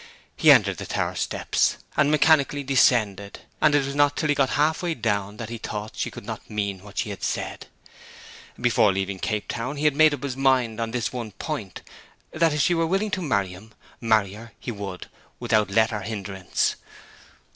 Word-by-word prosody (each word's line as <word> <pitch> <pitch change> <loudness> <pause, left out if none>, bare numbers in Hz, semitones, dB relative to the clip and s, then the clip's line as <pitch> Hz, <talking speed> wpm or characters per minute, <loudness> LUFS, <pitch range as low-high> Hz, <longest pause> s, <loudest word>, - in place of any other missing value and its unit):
He - - +4
entered - - +4
the - - -7
tower - - -1
steps, - - 0 0.2
and 150 -2 +3
mechanically 150 -2 +3
descended; 110 -7 +2 0.2
and 150 -1 +4
it 145 -2 +2
was 140 - -4
not 145 0 +2
till 155 - 0
he - - +5
got 135 -2 +2
half 155 +2 +2
way 170 -2 -1
down 105 -3 -2
that 115 -1 -6
he 115 - -5
thought 105 -1 -5
she - - -2
could - - -11
not - - -7
mean 100 -2 -2
what 105 -1 -14
she 105 - -1
had 100 - -8
said. - - -3 0.9
Before 120 -4 +3
leaving 95 0 -3
Cape 105 +1 -2
Town 125 +5 -4
he 145 +1 -3
had 150 -2 +3
made 155 0 +5
up 140 - -13
his 135 -3 -3
mind 130 -4 +1
on 115 - -2
this 120 -1 -2
one 115 -4 -5
point; 110 - -6 0.5
that 165 0 +2
if 150 0 0
she 175 - +3
were 165 -1 +1
willing 195 +4 0
to 190 - -1
marry 100 - 0
him, 100 +5 -13 0.2
marry 110 -4 +2
her 115 +3 -11
he 120 - -5
would 100 -4 -6 0.3
without 110 -2 +1
let 110 +3 +2
or 105 - -3
hindrance. 95 -3 -2
115 Hz, 200 wpm, -24 LUFS, 105-145 Hz, 0.9 s, he